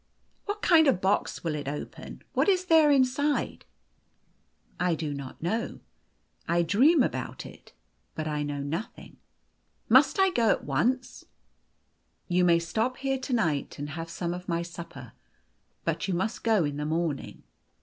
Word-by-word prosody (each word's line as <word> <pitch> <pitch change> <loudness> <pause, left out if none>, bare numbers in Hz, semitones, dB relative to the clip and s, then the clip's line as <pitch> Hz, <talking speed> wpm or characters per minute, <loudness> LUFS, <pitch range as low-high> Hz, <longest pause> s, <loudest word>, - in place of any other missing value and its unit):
" - - -42
What 415 +1 -4
kind 320 -3 +6
of 270 - +5
a - - -7
box 190 +2 0
will 165 -2 -1
it 145 -2 -5
open? 145 +1 -7
What - - +2
is 370 -1 +2
there 320 -3 +5
inside? 280 +1 +1 0.4
" - - -43 0.2
" - - -37
I 170 - +2
do 155 -2 -3
not 140 +1 -8
know. 225 +7 -2 0.7
I 170 +1 +2
dream 260 - +4
about - - -4
it, - - -14 0.4
but 155 0 -3
I 150 -1 -2
know 145 -1 -3
nothing." 165 +11 -6 0.4
" - - -44
Must - - +5
I 385 -1 +5
go 235 -9 +2
at - - +1
once? 240 - -1 0.4
" - - -45
" - - -45
You 180 - +4
may 170 -1 +5
stop 220 +10 -1
here 270 0 -1
to 260 0 -4
night, 160 - 0
and 145 +1 -5
have 165 +2 -6
some 170 0 -3
of 180 +1 -8
my 170 0 0
supper. 170 0 -9 0.7
But - - -2
you 185 - 0
must 220 +6 -2
go 220 -6 +3
in 145 0 -3
the 150 - -3
morning. 160 -2 -3
180 Hz, 180 wpm, -28 LUFS, 155-260 Hz, 0.7 s, kind